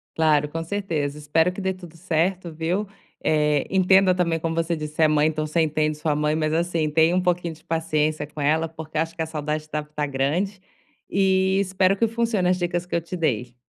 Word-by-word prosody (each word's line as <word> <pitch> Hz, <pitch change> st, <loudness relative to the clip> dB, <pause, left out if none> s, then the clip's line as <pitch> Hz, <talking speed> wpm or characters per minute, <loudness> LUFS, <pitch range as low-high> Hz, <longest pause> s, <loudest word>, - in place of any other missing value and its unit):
Claro, 150 Hz, -2 st, +3 dB
com 165 Hz, +2 st, -4 dB
certeza. 165 Hz, -6 st, -2 dB
Espero 160 Hz, +4 st, +2 dB
que 190 Hz, -, -7 dB
dê 190 Hz, 0 st, 0 dB
tudo 175 Hz, -3 st, -13 dB
certo, 175 Hz, +1 st, -1 dB
viu. 175 Hz, +6 st, -1 dB, 0.4 s
Eh, 150 Hz, -2 st, +2 dB
entenda 190 Hz, 0 st, +4 dB
também, 170 Hz, -2 st, 0 dB
como 165 Hz, 0 st, -2 dB
você 165 Hz, 0 st, 0 dB
disse, 155 Hz, 0 st, -4 dB
é 155 Hz, -, +7 dB
mãe, 150 Hz, 0 st, +3 dB
então 155 Hz, -1 st, -1 dB
você 160 Hz, +2 st, +1 dB
entende 155 Hz, -1 st, 0 dB
sua 150 Hz, -1 st, 0 dB
mãe, 150 Hz, +1 st, +1 dB
mas 155 Hz, 0 st, 0 dB
assim, 165 Hz, -2 st, 0 dB
tenha 160 Hz, +3 st, +3 dB
um 185 Hz, -, +2 dB
pouquinho 175 Hz, -2 st, 0 dB
de 155 Hz, -, -18 dB
paciência 155 Hz, -2 st, 0 dB
com 150 Hz, -, -11 dB
ela 160 Hz, +3 st, +2 dB
porque 160 Hz, -1 st, -8 dB
acho 165 Hz, +1 st, -1 dB
que 165 Hz, -, -4 dB
a -, -, 0 dB
saudade 155 Hz, 0 st, -3 dB
deve 150 Hz, 0 st, -3 dB
tá 150 Hz, -, 0 dB
grande, 155 Hz, +9 st, -1 dB, 0.5 s
e 190 Hz, 0 st, +2 dB
espero 190 Hz, 0 st, +2 dB
que 230 Hz, -, +2 dB
funcione 225 Hz, -4 st, 0 dB
as 185 Hz, -, +2 dB
dicas 175 Hz, 0 st, -1 dB
que 180 Hz, -, -4 dB
eu 170 Hz, -, +1 dB
te 170 Hz, +3 st, -7 dB
dei. 125 Hz, -6 st, -1 dB
165 Hz, 215 wpm, -23 LUFS, 155-180 Hz, 0.5 s, é